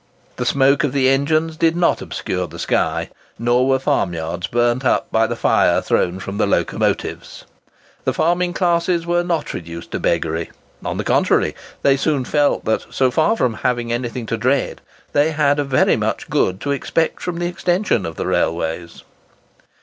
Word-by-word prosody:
The -, -, -2 dB
smoke 140 Hz, +1 st, +3 dB
of 140 Hz, -3 st, 0 dB
the 135 Hz, -2 st, +3 dB
engines 155 Hz, +4 st, +1 dB
did 165 Hz, 0 st, +2 dB
not 175 Hz, 0 st, +2 dB
obscure 90 Hz, -1 st, -3 dB
the -, -, -11 dB
sky, -, -, -1 dB, 0.3 s
nor 120 Hz, +2 st, +2 dB
were 135 Hz, 0 st, +3 dB
farmyards 90 Hz, -, -1 dB
burnt 120 Hz, +4 st, +1 dB
up 130 Hz, -, +1 dB
by 110 Hz, 0 st, +3 dB
the -, -, -3 dB
fire -, -, +3 dB
thrown 90 Hz, +2 st, 0 dB
from 95 Hz, +2 st, -6 dB
the -, -, +2 dB
locomotives. -, -, -1 dB, 0.6 s
The -, -, +1 dB
farming 175 Hz, +2 st, +1 dB
classes 170 Hz, -1 st, +1 dB
were 175 Hz, 0 st, +1 dB
not 170 Hz, -3 st, -2 dB
reduced 85 Hz, 0 st, -8 dB
to -, -, -2 dB
beggary; 80 Hz, 0 st, -1 dB, 0.3 s
on -, -, -3 dB
the -, -, -2 dB
contrary, -, -, +2 dB, 0.3 s
they 140 Hz, 0 st, +4 dB
soon 140 Hz, -2 st, 0 dB
felt 145 Hz, +1 st, +1 dB
that, 110 Hz, -, 0 dB
so 130 Hz, -1 st, +1 dB
far 160 Hz, -, +2 dB
from 125 Hz, -, +1 dB
having 120 Hz, 0 st, -1 dB
anything 120 Hz, 0 st, -3 dB
to 115 Hz, -, -2 dB
dread, 130 Hz, +4 st, 0 dB, 0.3 s
they 150 Hz, +2 st, +3 dB
had 145 Hz, -1 st, +2 dB
very 135 Hz, -3 st, +2 dB
much -, -, -3 dB
good 95 Hz, +1 st, +1 dB
to 145 Hz, -, -2 dB
expect 160 Hz, +3 st, -1 dB
from 180 Hz, -1 st, -3 dB
the 175 Hz, -, -2 dB
extension 175 Hz, -, 0 dB
of 80 Hz, -2 st, -6 dB
railways. 85 Hz, +1 st, -2 dB
135 Hz, 170 wpm, -19 LUFS, 110-160 Hz, 0.6 s, they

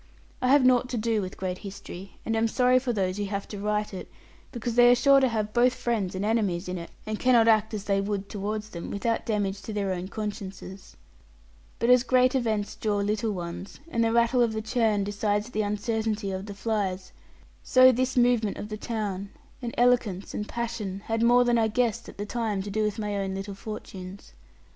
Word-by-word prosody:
I 250 Hz, -, +1 dB
have 275 Hz, 0 st, +5 dB
naught 250 Hz, 0 st, +4 dB
to 250 Hz, -, -2 dB
do 220 Hz, -1 st, 0 dB
with 185 Hz, -1 st, -6 dB
great 185 Hz, -1 st, -3 dB
history 195 Hz, -1 st, -9 dB
and 225 Hz, -, 0 dB
am 225 Hz, +1 st, +2 dB
sorry 250 Hz, +2 st, +3 dB
for 255 Hz, -1 st, -2 dB
those 190 Hz, -4 st, -1 dB
who 205 Hz, -, -1 dB
have 200 Hz, 0 st, -4 dB
to 205 Hz, -, -6 dB
write 210 Hz, 0 st, -1 dB
it; 185 Hz, -, -7 dB, 0.4 s
because 240 Hz, -1 st, -3 dB
they 245 Hz, +1 st, +7 dB
are 245 Hz, -, +7 dB
sure 275 Hz, +3 st, +5 dB
to 265 Hz, -, +3 dB
have 215 Hz, -3 st, -2 dB
both 250 Hz, +1 st, +4 dB
friends 210 Hz, -6 st, -1 dB
and 190 Hz, +2 st, -2 dB
enemies 200 Hz, -5 st, 0 dB
in 180 Hz, 0 st, -3 dB
it, 170 Hz, -, -8 dB, 0.2 s
and 215 Hz, 0 st, -3 dB
cannot 240 Hz, -3 st, +4 dB
act 220 Hz, -1 st, +4 dB
as 205 Hz, -, -4 dB
they 195 Hz, -1 st, +1 dB
would 200 Hz, -1 st, -3 dB
towards 210 Hz, +1 st, -4 dB
them, 170 Hz, -1 st, -6 dB
without 230 Hz, +4 st, -1 dB
damage 205 Hz, -3 st, -1 dB
to -, -, -7 dB
their 200 Hz, -2 st, -1 dB
own 180 Hz, 0 st, -4 dB
consciences. 200 Hz, -2 st, -7 dB, 0.8 s
But 235 Hz, -, +2 dB
as 250 Hz, -1 st, +7 dB
great 255 Hz, 0 st, +3 dB
events 220 Hz, -5 st, -1 dB
draw 210 Hz, -2 st, -1 dB
little 210 Hz, +2 st, 0 dB
ones, 175 Hz, +1 st, -7 dB
and 230 Hz, -6 st, +1 dB
the 225 Hz, -, +2 dB
rattle 235 Hz, +2 st, +3 dB
of 230 Hz, -2 st, +2 dB
the 220 Hz, -, -2 dB
churn 220 Hz, -3 st, +1 dB
decides 205 Hz, +2 st, -1 dB
the 215 Hz, -, 0 dB
uncertainty 210 Hz, 0 st, -1 dB
of 190 Hz, +2 st, -5 dB
the 200 Hz, -, -7 dB
flies, 195 Hz, -3 st, -2 dB, 0.5 s
so 255 Hz, 0 st, +6 dB
this 255 Hz, +1 st, -1 dB
movement 240 Hz, -4 st, +3 dB
of 210 Hz, -, -6 dB
the 215 Hz, -, -4 dB
town, 205 Hz, -4 st, -3 dB, 0.3 s
and 240 Hz, -1 st, -3 dB
eloquence, 240 Hz, -6 st, +2 dB
and 210 Hz, -, -4 dB
passion 215 Hz, -5 st, -4 dB
had 225 Hz, 0 st, -1 dB
more 240 Hz, +1 st, +5 dB
than 240 Hz, -1 st, +2 dB
I 220 Hz, -, +3 dB
guessed 235 Hz, 0 st, -1 dB
at -, -, -13 dB
the 205 Hz, -, -4 dB
time, 215 Hz, -3 st, -2 dB
to 205 Hz, -, -6 dB
do 215 Hz, +2 st, 0 dB
with 210 Hz, -1 st, 0 dB
my 210 Hz, -2 st, -2 dB
own 195 Hz, -1 st, -2 dB
little 195 Hz, +1 st, -5 dB
fortunes. 195 Hz, -, -9 dB
215 Hz, 215 wpm, -27 LUFS, 200-235 Hz, 0.8 s, they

